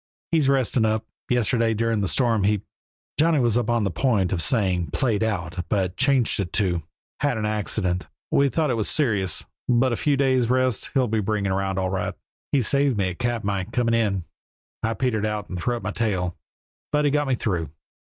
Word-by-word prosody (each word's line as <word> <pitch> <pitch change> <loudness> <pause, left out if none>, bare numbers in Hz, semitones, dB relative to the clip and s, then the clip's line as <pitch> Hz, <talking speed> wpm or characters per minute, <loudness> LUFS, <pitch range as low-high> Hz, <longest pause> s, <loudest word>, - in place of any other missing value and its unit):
"He's 155 -5 +3
resting 130 -3 +2
up. 110 0 0 0.2
Yesterday, 115 -1 +2
during 115 -1 0
the 100 - 0
storm 115 -1 +2
he 105 0 +1 0.3
" - - -21
Johnny 160 -1 +4
was 120 -3 +2
upon 120 -1 +1
the 100 - 0
point 100 -2 +1
of 90 - 0
saying 90 - +1
"played 115 - 0
out," 95 -4 -2
but 95 -3 0
changed 130 -1 +2
it 95 -3 -2
to 90 -5 +1 0.4
"had 145 -5 +1
an 110 - -2
accident. 100 -3 -1 0.2
We 140 0 +4
thought 155 -1 0
it 120 - 0
was 110 - 0
serious, 105 - +1 0.2
but 120 +1 +3
a - - +1
few 145 +3 +1
days' 130 -3 +2
rest'll 130 0 +1
bring 105 0 -1
him 95 - +1
around 95 0 -1
all 95 -1 0
right. 95 -1 -2 0.4
He 135 -3 +3
saved 140 0 +2
me 95 -2 +1
at 85 - -10
Katmai, 105 -6 -1
coming 115 +2 0
in. 105 -5 +1 0.6
I 115 0 -1
petered 110 -1 0
out 105 -1 -2
and 90 - -4
threw 120 +6 -1
up - - -9
my 105 - -2
tail, 95 -7 -1 0.6
but 150 0 +2
he 145 - +3
got 145 0 +1
me 130 - +2
through. 90 -9 -2
110 Hz, 200 wpm, -24 LUFS, 95-125 Hz, 0.6 s, Johnny